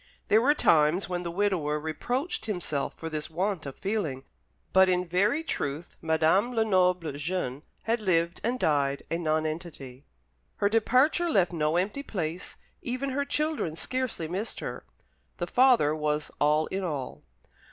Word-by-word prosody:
There 215 +2 +5
were 290 +5 +4
times 160 - +3
when 180 -1 -2
the 175 - -4
widower 170 -5 0
reproached 240 - -3
himself 175 -9 -2
for 165 - -7
this 155 -1 -4
want 180 -1 -2
of 135 - -8
feeling; 185 -11 -2 0.5
but 190 0 +6
in 180 0 +1
very 200 - +1
truth 150 - -4
Madame 165 +9 +2
Lenoble, 180 -7 +2
jeune, 145 -2 -3 0.2
had 230 +1 +1
lived 170 -3 +1
and 245 +3 0
died 140 - +1
a 165 - 0
nonentity. 155 -4 -3 0.5
Her 200 - +1
departure 255 - +3
left 180 - +2
no 155 -1 +1
empty 205 +10 -1
place; 175 - -4 0.2
even 255 +3 -3
her 280 +2 -1
children 300 - -1
scarcely 255 -5 -3
missed 190 +7 -4
her. - - -6 0.5
The - - -2
father 245 - +4
was 150 -1 -1
all 150 +1 +3
in 195 0 -2
all. 145 -7 -4
180 Hz, 150 wpm, -28 LUFS, 155-220 Hz, 0.5 s, but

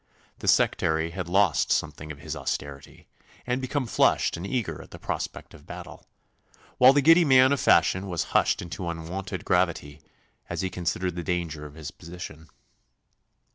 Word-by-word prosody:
The - - -7
sectary 80 0 +2
had 90 -1 -5
lost 95 -3 +2
something 75 +1 -1
of 75 - -9
his - - -6
austerity 70 -1 -6 0.4
and 125 +1 -1
become 130 +1 -2
flushed 115 - +2
and 85 +3 -6
eager 120 -2 -3
at - - -14
the - - -10
prospect - - -5
of - - -16
battle, - - -10 0.7
while 125 +1 +9
the 140 0 +2
giddy 165 +4 +7
man 130 -3 +6
of 140 - +1
fashion 95 -2 +3
was 85 -3 -1
hushed - - +2
into 85 +1 -5
unwonted 85 +3 -5
gravity 80 -5 0 0.5
as - - -3
he 95 -1 -2
considered 90 0 -2
the 85 - -4
danger 85 -4 -3
of 75 - -15
his 80 -2 -7
position. 85 -2 -10
90 Hz, 165 wpm, -26 LUFS, 80-105 Hz, 0.7 s, while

